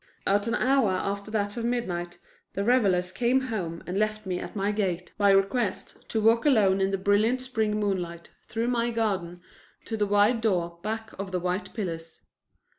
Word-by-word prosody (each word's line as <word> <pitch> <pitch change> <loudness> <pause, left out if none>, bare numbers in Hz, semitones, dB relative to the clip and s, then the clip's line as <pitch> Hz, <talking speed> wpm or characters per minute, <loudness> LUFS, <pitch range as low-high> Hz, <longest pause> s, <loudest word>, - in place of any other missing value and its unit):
At 200 +2 +2
an 230 - +1
hour 265 -4 +3
after 200 +2 -3
that 205 0 -1
of 235 - -2
midnight 180 -8 -2 0.4
the 200 - -1
revelers 195 -7 +2
came 240 +7 +2
home 195 -10 -4
and 185 +3 -2
left 215 0 -1
me 180 -1 -2
at - - -7
my 200 0 0
gate, 185 -4 -2
by 205 -1 +3
request, 195 +2 0
to 225 - 0
walk 225 +2 +4
alone 205 -9 +4
in 190 - +2
the 195 - 0
brilliant 205 +6 +2
spring 220 -5 -1
moonlight 180 -5 -2 0.2
through 230 +2 -1
my 240 -1 +1
garden 195 -7 -2 0.4
to 225 - -3
the 210 -1 0
wide 205 +3 +3
door 175 -6 0
back 220 +2 -4
of 195 -1 -4
the 180 - 0
white 180 +3 -2
pillars. 165 -6 -5
205 Hz, 185 wpm, -27 LUFS, 185-225 Hz, 0.4 s, walk